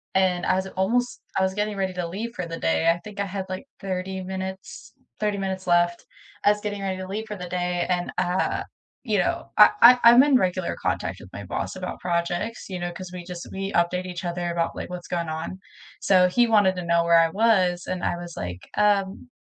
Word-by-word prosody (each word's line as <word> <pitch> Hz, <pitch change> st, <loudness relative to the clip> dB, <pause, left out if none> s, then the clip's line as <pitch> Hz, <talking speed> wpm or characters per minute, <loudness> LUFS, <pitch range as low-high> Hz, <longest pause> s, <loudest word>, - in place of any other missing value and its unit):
and 185 Hz, -2 st, +2 dB
I 185 Hz, -, +3 dB
was 190 Hz, -, -1 dB
it -, -, -11 dB
almost 245 Hz, +6 st, 0 dB, 0.2 s
I -, -, +3 dB
was 190 Hz, 0 st, 0 dB
getting 210 Hz, 0 st, -2 dB
ready 190 Hz, -1 st, -1 dB
to 180 Hz, -2 st, -3 dB
leave 215 Hz, +7 st, -5 dB
for 180 Hz, -, -4 dB
the 165 Hz, 0 st, -5 dB
day, 80 Hz, -, +2 dB
I 170 Hz, -, -2 dB
think 210 Hz, -1 st, -10 dB
I 200 Hz, -, 0 dB
had, 190 Hz, 0 st, -4 dB
like, 185 Hz, +7 st, -5 dB
30 190 Hz, -1 st, -4 dB
minutes 190 Hz, 0 st, -7 dB, 0.3 s
30 210 Hz, -1 st, 0 dB
minutes 190 Hz, -1 st, -3 dB
left. 175 Hz, 0 st, +2 dB, 0.4 s
I 205 Hz, -, +7 dB
was 210 Hz, -, -2 dB
getting 205 Hz, -1 st, -4 dB
ready 190 Hz, -1 st, -2 dB
to 185 Hz, -, -6 dB
leave 210 Hz, +3 st, -4 dB
for 210 Hz, -, -5 dB
the 180 Hz, -1 st, -7 dB
day, 180 Hz, -1 st, -1 dB
and, 180 Hz, -1 st, 0 dB
uh, 180 Hz, +1 st, 0 dB, 0.4 s
you -, -, 0 dB
know, -, -, -1 dB
uh -, -, +9 dB
I 250 Hz, +1 st, +10 dB
I'm 235 Hz, +2 st, +9 dB
in 285 Hz, -2 st, +4 dB
regular 185 Hz, -3 st, -1 dB
contact -, -, -2 dB
with -, -, -13 dB
my -, -, -7 dB
boss -, -, -4 dB
about -, -, -6 dB
projects, 175 Hz, +6 st, -2 dB
you 185 Hz, -, -4 dB
know, 175 Hz, 0 st, -3 dB
'cause 185 Hz, +1 st, -8 dB
we 180 Hz, -, -6 dB
just 175 Hz, -1 st, -7 dB
we 195 Hz, +1 st, -4 dB
update 175 Hz, +2 st, +1 dB
each 180 Hz, -1 st, -6 dB
other 175 Hz, 0 st, -2 dB
about, 170 Hz, -1 st, -1 dB
like, -, -, -6 dB
what's 180 Hz, -1 st, -7 dB
going 170 Hz, -2 st, -2 dB
on. 160 Hz, +4 st, -5 dB, 0.4 s
So, 185 Hz, -2 st, +5 dB
he 240 Hz, +6 st, +3 dB
wanted 205 Hz, -4 st, +4 dB
to 180 Hz, -1 st, -5 dB
know 170 Hz, 0 st, +3 dB
where 170 Hz, 0 st, +5 dB
I 165 Hz, 0 st, +4 dB
was, 190 Hz, -5 st, +2 dB
and 185 Hz, -1 st, -3 dB
I -, -, 0 dB
was, 175 Hz, 0 st, -8 dB
like, 90 Hz, 0 st, -5 dB, 0.2 s
"Um" 205 Hz, +2 st, +1 dB
185 Hz, 230 wpm, -24 LUFS, 175-200 Hz, 0.4 s, I